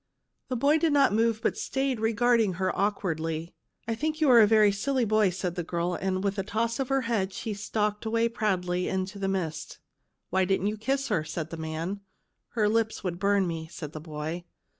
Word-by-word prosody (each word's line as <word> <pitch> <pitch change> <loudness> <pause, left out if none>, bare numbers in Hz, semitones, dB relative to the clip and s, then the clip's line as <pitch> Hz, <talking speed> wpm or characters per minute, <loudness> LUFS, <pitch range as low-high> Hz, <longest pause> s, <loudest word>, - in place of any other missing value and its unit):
The 255 - -2
boy 285 +6 +3
did 320 -2 +2
not 280 -6 +4
move, 225 0 +2
but - - +1
stayed 270 -3 -1
regarding 225 -2 +2
her 185 +2 -1
awkwardly. 165 -5 -1 0.2
" - - -44
I 230 - 0
think 310 +7 -2
you 300 -4 +4
are 240 - +8
a 210 - +7
very 215 -1 +5
silly 250 +5 0
boy," 215 -2 +3
said 180 -1 -3
the 175 -1 -3
girl, 170 +1 -1 0.3
with 200 0 -1
a - - 0
toss 225 +4 -1
of 270 - -1
her 270 0 +2
head, 230 -3 0
and 190 - -13
she 220 - -4
stalked 210 0 -2
away 230 +1 +2
proudly 180 -6 -1
into 190 +1 -3
the 195 - -1
mist. 165 -5 -3 0.5
"Why 190 0 +3
didn't 190 +1 +1
you 210 +1 0
kiss 270 +5 -1
her?" 210 - +2
asked 160 +1 -5
the - - -4
man. 160 +4 -4 0.3
" - - -52
Her 210 -2 +4
lips 220 0 0
would 175 -2 -3
burn 200 0 +3
me," 165 -2 -4
said 155 -3 -7
the 155 - -6
boy. 155 +2 -5
205 Hz, 215 wpm, -28 LUFS, 180-230 Hz, 0.5 s, are